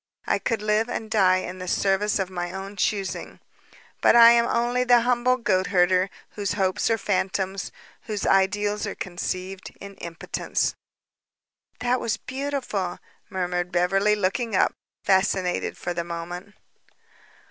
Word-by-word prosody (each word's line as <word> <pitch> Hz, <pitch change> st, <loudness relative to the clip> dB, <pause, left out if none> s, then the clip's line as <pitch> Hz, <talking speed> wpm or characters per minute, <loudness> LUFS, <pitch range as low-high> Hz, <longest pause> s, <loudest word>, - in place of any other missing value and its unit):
I -, -, +1 dB
could 220 Hz, -2 st, -2 dB
live 215 Hz, +2 st, +1 dB
and 220 Hz, -1 st, -4 dB
die 185 Hz, -4 st, +3 dB
in 185 Hz, +1 st, -7 dB
the 185 Hz, -, -6 dB
service 200 Hz, +3 st, +1 dB
of 190 Hz, -2 st, -2 dB
my 175 Hz, -1 st, -3 dB
own 195 Hz, +2 st, -7 dB
choosing. 195 Hz, 0 st, -2 dB, 0.6 s
But -, -, +5 dB
I 235 Hz, 0 st, +10 dB
am 235 Hz, 0 st, +4 dB
only 240 Hz, +1 st, +1 dB
the 245 Hz, -1 st, +5 dB
humble 250 Hz, +1 st, +2 dB
goat 190 Hz, -6 st, +1 dB
hunter 185 Hz, 0 st, +3 dB, 0.2 s
whose 200 Hz, -3 st, -2 dB
hopes 190 Hz, 0 st, 0 dB
are 225 Hz, -, +2 dB
phantoms, 190 Hz, -1 st, -1 dB, 0.4 s
whose 210 Hz, -2 st, -3 dB
ideals 205 Hz, +2 st, +2 dB
are 200 Hz, -, -4 dB
conceived 185 Hz, +1 st, -5 dB
in 200 Hz, 0 st, -9 dB
impotence." 170 Hz, -1 st, -2 dB, 1.1 s
"That 250 Hz, +1 st, +1 dB
was 225 Hz, -, -1 dB
beautiful," 260 Hz, -9 st, -3 dB, 0.3 s
murmured 180 Hz, -2 st, -2 dB
Beverly, 195 Hz, +4 st, +2 dB
looking 210 Hz, +3 st, -1 dB
up, -, -, +3 dB, 0.3 s
fascinated 190 Hz, -2 st, +1 dB
for 175 Hz, -, -3 dB
the 170 Hz, 0 st, -2 dB
moment. 175 Hz, +4 st, -7 dB
195 Hz, 140 wpm, -25 LUFS, 185-220 Hz, 1.1 s, I